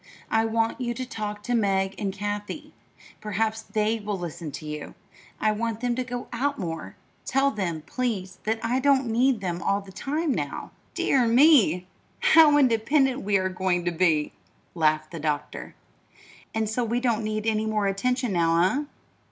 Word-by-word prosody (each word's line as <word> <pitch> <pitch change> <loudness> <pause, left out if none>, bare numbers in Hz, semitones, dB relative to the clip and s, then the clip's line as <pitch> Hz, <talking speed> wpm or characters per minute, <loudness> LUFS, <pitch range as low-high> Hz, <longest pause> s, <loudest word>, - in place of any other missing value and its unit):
"I 225 0 +3
want 225 +2 0
you 240 -1 -2
to 255 +1 -4
talk 210 -3 -5
to 245 - -2
Meg 195 -4 +1
and 200 -3 -1
Kathie. 205 +9 -5 0.5
Perhaps 220 +1 -1
they 220 +1 -1
will 205 -1 -3
listen 170 -3 -6
to - - -7
you. 150 -1 -6 0.4
I 215 - +2
want 225 +1 -2
them 245 0 0
to 255 +1 -1
go 245 0 -5
out 280 +4 0
more. 165 - -5 0.3
Tell 275 +2 +2
them, 175 - -3
please, 200 -7 -3
that 220 +1 0
I 245 +3 +1
don't 275 -1 +3
need 245 0 +2
them 175 -2 -3
all 200 0 +1
the 195 -1 -12
time 295 - -2
now." - - -4 0.2
"Dear 255 -4 +2
me, 230 - +5 0.3
how 325 -11 +6
independent 265 +1 +3
we 200 0 +2
are 185 0 0
going 185 -1 -1
to 175 - +1
be!" 160 -3 +1 0.4
laughed 155 -2 +1
the 165 - -6
doctor. 150 -1 -3 0.8
"And 220 -1 -1
so 220 +3 -1
we 235 +1 0
don't 235 -3 0
need 215 0 -2
any 220 -1 +1
more 215 -1 0
attention 245 +4 0
now, 170 +7 +3
eh?" - - -7
215 Hz, 175 wpm, -26 LUFS, 190-245 Hz, 0.8 s, how